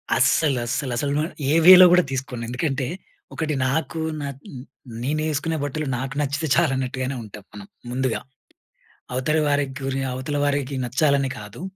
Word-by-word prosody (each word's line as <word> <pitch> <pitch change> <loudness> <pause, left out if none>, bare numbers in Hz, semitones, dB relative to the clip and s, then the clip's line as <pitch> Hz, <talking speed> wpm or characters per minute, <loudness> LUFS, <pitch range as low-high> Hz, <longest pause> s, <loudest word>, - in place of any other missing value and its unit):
అస్సలు 145 -6 +3
అస్సల, 130 +3 -2
అసలు 140 +3 -1
నేను 155 +4 -1 0.2
ఏ - - +3
వేలో 185 0 +11
కూడా 180 0 +5
తీసుకోను. 130 -2 -4
ఎందుకంటే, 135 +2 -1 0.5
ఒకటి 155 -1 -2
నాకు, 160 +4 -2 0.2
నా 145 - -3 0.8
నేనేసుకునే 155 +3 -1
బట్టలు 145 +1 -3
నాకు 135 +2 -4
నచ్చితే 145 +2 -1
చాలు 170 -4 +3
అన్నట్టుగానే 130 0 -3
ఉంటాం 105 -1 -11
మనం 105 -1 -9 0.3
ముందుగా. 130 -1 -1 0.9
అవతల 130 +5 0
వారికి 145 -2 0
గురి 135 0 -2
అవతల 130 +3 -3
వారికి 140 -1 -1
నచ్చాలని 135 +2 +1
కాదు. 105 +6 -10
140 Hz, 145 wpm, -23 LUFS, 130-155 Hz, 0.9 s, వేలో